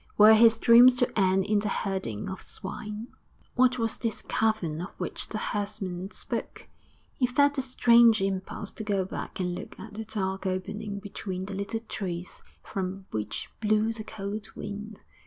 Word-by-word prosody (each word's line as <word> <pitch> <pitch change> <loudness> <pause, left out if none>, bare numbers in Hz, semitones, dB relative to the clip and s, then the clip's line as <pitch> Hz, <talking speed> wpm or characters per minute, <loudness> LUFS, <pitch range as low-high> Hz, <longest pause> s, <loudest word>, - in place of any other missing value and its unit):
Were 215 +1 +9
his 225 0 +6
dreams 240 +2 +8
to 245 0 +1
end 190 0 +3
in 210 0 +2
the 210 0 -1
herding 190 - -2
of 190 - -6
swine? 210 +4 -7 0.4
What 255 0 +4
was 225 -2 -1
this 225 -3 -2
cavern 205 -8 0
of 180 - -5
which - - -2
the 215 - -4
herdsman 200 -3 -3
spoke? - - -5 0.5
He 250 - +1
felt 285 +3 +3
a - - +2
strange 235 -3 +5
impulse 195 +1 -3
to 220 - -7
go 200 -3 0
back 190 - -6
and 180 -1 -1
look - - -8
at 215 - -9
the 220 +1 -5
dark 195 -3 -2
opening 200 +3 -3
between 195 -2 -5
the 200 - -6
little 200 +3 -3
trees 180 -6 -5 0.2
from 190 0 -4
which 105 0 -4
blew 215 +1 +2
the 220 -1 -7
cold 205 +1 -5
wind.... 210 +1 -7
210 Hz, 170 wpm, -28 LUFS, 190-225 Hz, 0.5 s, Were